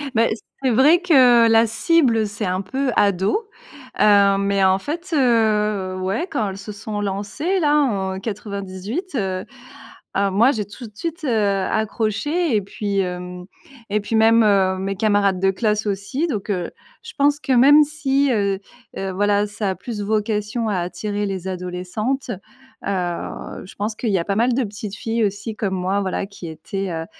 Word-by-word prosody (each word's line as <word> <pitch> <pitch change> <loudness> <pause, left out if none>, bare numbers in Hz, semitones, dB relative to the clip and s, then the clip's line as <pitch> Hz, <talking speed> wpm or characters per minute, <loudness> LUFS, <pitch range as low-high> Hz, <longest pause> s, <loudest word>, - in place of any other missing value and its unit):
Bah 225 - +4 0.4
c'est 260 - +3
vrai 285 +9 +5
que 255 -9 +6
la 225 +1 +5
cible, 230 -1 +2
c'est 205 +1 -4
un 185 +1 -1
peu 260 +6 -2
ado, 205 - +1 0.5
hem, 200 -1 +5
mais 200 -1 +2
en 190 0 +4
fait, 335 - -5
heu, 215 -7 +2
ouais, 195 - -2
quand 220 -9 -1
elles 190 - -7
se 195 +2 -8
sont 210 0 -5
lancées 205 - -2
là 295 -3 +3
en 195 -10 0
98, 205 - -5
heu, 190 -5 -2 0.7
alors 200 0 +2
moi 225 +7 +4
j'ai 215 -6 -2
tout 205 +5 -10
de 210 - -18
suite, 335 +5 -5
heu, - - 0 0.4
accroché 225 - 0
et 210 - +2
puis, 200 0 -3
hem, 180 -1 -4 0.4
et 210 +1 +1
puis 210 +2 -3
même, 225 +1 +5
heu, 195 -3 +3
mes 195 +1 -2
camarades 200 -2 +2
de 190 +1 +3
classe 210 +1 0
aussi. 200 - -2
Donc, 215 - -4
heu, 180 -3 -2 0.3
je 460 0 -10
pense 290 0 +3
que 270 - -1
même 285 +5 +7
si, 285 -2 0
heu, 200 -4 0 0.4
heu, 195 0 -3
voilà 205 +1 +2
ça 205 0 -3
a - - -4
plus 220 -1 -6
vocation 210 +2 -1
à 195 -3 0
attirer 205 +4 -3
les 190 -2 -4
adolescentes, 185 +8 -3 0.6
heu, 180 -3 -4
je 185 - -13
pense 210 +2 -2
qu'il 230 - -2
y 195 - +2
a 170 - -3
pas 200 - -1
mal 240 +4 +2
de 260 +1 +1
petites 205 -1 -6
filles 225 +1 -1
aussi 205 +3 -3
comme 195 -3 -2
moi 190 +2 0
voilà 190 0 -2
qui 200 -4 -10
étaient, 185 +5 -5
heu, 165 0 -4
210 Hz, 180 wpm, -21 LUFS, 195-240 Hz, 0.7 s, même